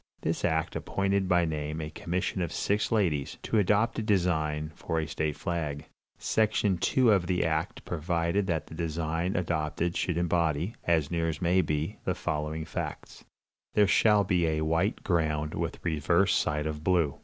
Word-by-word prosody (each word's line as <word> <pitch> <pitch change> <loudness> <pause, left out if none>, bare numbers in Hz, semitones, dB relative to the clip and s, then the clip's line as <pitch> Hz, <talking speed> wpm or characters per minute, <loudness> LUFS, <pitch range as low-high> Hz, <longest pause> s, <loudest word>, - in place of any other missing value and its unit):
This 80 +1 -2
act 80 -1 0
appointed 95 -1 0
by 90 -2 +4
name 75 0 -3
a 75 -1 -5
commission 90 +4 -2
of 85 - -2
six 105 +1 0
ladies, 85 -11 0
to 110 - +1
adopt 105 +4 +2
a - - 0
design 80 -7 0
for 80 - -2
a 80 - -1
state 75 0 -2
flag. 80 -5 -3 0.3
Section 105 -4 +1
2 125 +5 +3
of 95 -4 +2
the 90 -1 +1
act 80 +7 -2
provided 85 +4 0
that 80 -5 -1
the - - -12
design 80 +2 -2
adopted 85 0 -1
should 90 -3 -1
embody, 85 +2 +1
as 80 -3 +2
near 85 -1 0
as 75 -1 -4
may 90 +2 +3
be, 75 -2 -2
the - - -1
following 75 +1 -3
facts: - - -6 0.5
"There 105 - +6
shall 105 +1 +4
be 90 -3 +1
a 80 -1 0
white 80 +7 0
ground 75 -3 0
with - - -3
reverse 85 +4 +2
side 75 -1 0
of 75 -1 -4
blue. 85 -5 +1
85 Hz, 170 wpm, -29 LUFS, 80-95 Hz, 0.5 s, There